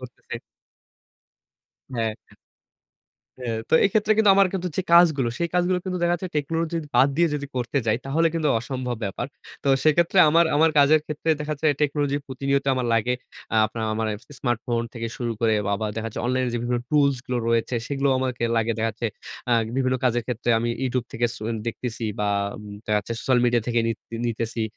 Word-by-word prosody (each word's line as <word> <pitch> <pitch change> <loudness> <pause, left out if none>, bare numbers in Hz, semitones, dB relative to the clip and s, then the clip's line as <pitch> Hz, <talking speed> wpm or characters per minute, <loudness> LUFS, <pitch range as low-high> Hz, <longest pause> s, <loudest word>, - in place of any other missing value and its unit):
ঘুরতেছে। 125 -1 -10 1.6
হ্যাঁ। 110 -1 0 1.3
হ্যাঁ। 115 -3 -2
তো - - +4
এক্ষেত্রে 210 +1 +3
কিন্তু 215 -2 +5
আমার 195 -1 +6
কিন্তু 180 -1 -2
যে 190 - +1
কাজগুলো, 155 -8 +6
সেই 170 0 0
কাজগুলো 180 +1 +2
কিন্তু 185 -1 -2
দেখা 175 0 +3
যাচ্ছে 180 +2 -4
টেকনোলজির 165 +2 -1
বাদ 135 - +6
দিয়ে 170 0 +4
যদি 140 -1 -3
করতে 125 +3 -1
যাই, 110 - +3
তাহলে 165 +4 +2
কিন্তু 155 -3 +1
অসম্ভব 125 -1 -4
ব্যাপার। 100 +6 -3 0.4
তো - - +1 0.2
সেক্ষেত্রে 170 +4 +3
আমার, 165 +2 +5
আমার 160 +1 +5
কাজের 150 +2 +6
ক্ষেত্রে 155 +1 -2
দেখা 150 +1 -2
যাচ্ছে 155 - +2
টেকনোলজি 145 -1 +1
প্রতিনিয়ত 140 +1 -1
আমার 125 -1 -1
লাগে। 125 +3 +1 0.4
আ - - +3
আপনার 110 +1 -6
আ - - 0
মানে 110 -1 0 0.3
স্মার্টফোন 120 -1 -1
থেকে 115 -1 -3
শুরু 120 -2 -2
করে 110 -1 +3
বা - - 0
আবার 110 +1 -2
দেখাচ্ছে 110 -1 -4
অনলাইনে 130 0 +1
যে - - 0
বিভিন্ন 120 0 -1
টুলস 140 -3 +3
গুলো 125 -1 -1
রয়েছে, 115 +1 +1
সেগুলোও 140 -1 +1
আমাকে 130 -2 -2
লাগে। 115 0 +1
দেখা 115 - +1
যাচ্ছে 115 +2 -4 0.4
আ - - +4 0.2
বিভিন্ন 130 -1 +1
কাজের 120 -1 +2
ক্ষেত্রে 120 -1 -1
আমি 120 +1 -1 0.2
YouTube 125 -2 -1
থেকে 120 +1 +1
সু - - -10 0.2
দেখতেসি। 115 -1 -4
বা 105 - +1 0.3
উম 105 - -10 0.2
দেখা 105 0 +2
যাচ্ছে 105 +3 -5
সোশ্যাল 130 -2 +2
মিডিয়া 120 -2 +2
থেকে 120 -1 +1
নিত 115 -2 -2 0.3
নিতেছি, 115 0 -2
130 Hz, 185 wpm, -24 LUFS, 115-155 Hz, 1.6 s, আমার